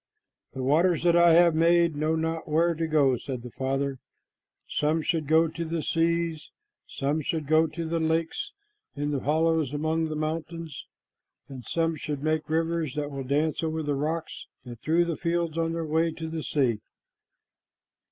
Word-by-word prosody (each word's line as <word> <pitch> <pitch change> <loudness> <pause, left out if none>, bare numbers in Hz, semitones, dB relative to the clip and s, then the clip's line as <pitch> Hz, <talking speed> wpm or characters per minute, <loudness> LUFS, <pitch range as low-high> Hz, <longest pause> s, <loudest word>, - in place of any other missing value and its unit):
"The 130 - -4
waters 165 +6 +3
that 170 -1 +4
I 170 -1 +6
have 170 0 +6
made 170 0 +3
know 155 +2 0
not 160 0 -2
where 165 +3 +3
to 165 0 -2
go," 140 -5 +3
said 125 -1 -6
the 125 - -8
Father. 135 +1 -2 0.7
"Some 155 +2 0
should 160 -2 -1
go 160 +2 +4
to 170 +1 -5
the 165 -1 -3
seas, 165 -1 0 0.4
some 145 +3 -1
should 155 +1 -2
go 155 +2 +4
to 165 +2 -5
the 165 +1 -1
lakes 165 - -1 0.4
in 145 +1 -2
the 140 - 0
hollows 155 0 +1
among 160 +2 0
the 155 - -4
mountains, 160 -1 -4 0.6
and 135 -3 -9
some 165 -1 0
should 145 -2 -4
make 155 -1 0
rivers 165 -2 0
that 150 -1 -3
will 135 -1 -5
dance 145 +4 0
over 160 -1 -2
the 145 -1 -1
rocks 155 +3 -3 0.2
and 120 -2 -9
through 170 +2 +2
the 170 -2 -3
fields 170 -2 -1
on 165 0 0
their 165 -1 -2
way 160 +2 +1
to 160 0 -6
the 160 0 -4
sea." 130 -8 0
160 Hz, 175 wpm, -27 LUFS, 150-165 Hz, 0.7 s, I